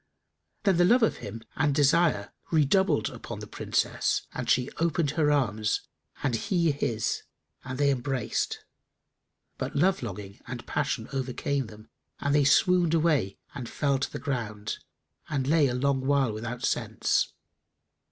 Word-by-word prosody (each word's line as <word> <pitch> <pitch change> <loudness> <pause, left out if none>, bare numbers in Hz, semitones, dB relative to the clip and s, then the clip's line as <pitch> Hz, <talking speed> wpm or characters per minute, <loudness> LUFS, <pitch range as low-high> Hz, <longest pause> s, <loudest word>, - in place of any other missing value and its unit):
Then 195 -4 +3
the 175 - +5
love 235 +7 +5
of 225 - +2
him 110 +2 -7
and 145 0 +2
desire 145 -6 +3 0.2
redoubled 155 - +3
upon - - -7
the - - -6
Princess - - 0
and 125 -1 -4
she 125 +2 +2
opened 165 -3 +1
her 150 -1 +2
arms 110 -7 +1 0.4
and 135 - +1
he 170 - +1
his, 115 -6 -1 0.4
and 130 -1 -5
they 140 0 +3
embraced; 130 -2 -2 0.9
but - - -3
love 185 +6 +3
longing 100 -1 -7
and 120 -1 -6
passion 140 -6 -1
overcame 135 0 -1
them 110 0 -13 0.3
and 145 - 0
they 145 -1 +4
swooned 175 +3 +4
away 150 - +2 0.2
and 125 -5 -6
fell 140 -2 +1
to - - -2
the - - -4
ground 110 -7 -3 0.5
and 135 -3 -1
lay 150 0 +4
a 125 - -1
long 135 +1 +1
while 140 -5 +3
without 115 +3 -5
sense. - - 0
140 Hz, 150 wpm, -28 LUFS, 120-155 Hz, 0.9 s, the